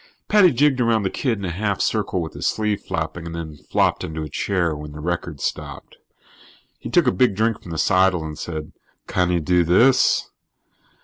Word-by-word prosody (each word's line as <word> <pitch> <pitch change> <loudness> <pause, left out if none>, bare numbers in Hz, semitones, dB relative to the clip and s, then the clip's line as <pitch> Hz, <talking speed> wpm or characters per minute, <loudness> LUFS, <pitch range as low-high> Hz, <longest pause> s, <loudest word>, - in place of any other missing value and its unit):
Paddy 205 -4 +6
jigged 135 0 +2
around 115 -3 +2
the 95 - -1
kid 120 -5 -1
in 100 - -5
a 90 - -2
half 100 +2 -2
circle 100 -5 0
with 80 - -7
his - - -2
sleeve 105 -2 -1
flapping 80 +1 -4
and 85 - -6
then 80 -3 -7
flopped - - +1
into 80 0 -4
a 75 - -6
chair 85 0 -1
when 75 0 -8
the 75 - -9
record 85 -2 -3
stopped. - - -5 0.8
He - - -7
took - - +3
a - - +4
big 100 +2 +2
drink 110 +1 0
from - - -12
the 80 - -5
seidel 90 +1 +3
and 75 -1 -6
said: 80 0 -6 0.3
"Can 90 -1 0
he 90 -1 +2
do 90 +2 +2
this?" 115 +11 +3
90 Hz, 200 wpm, -22 LUFS, 80-110 Hz, 0.8 s, Paddy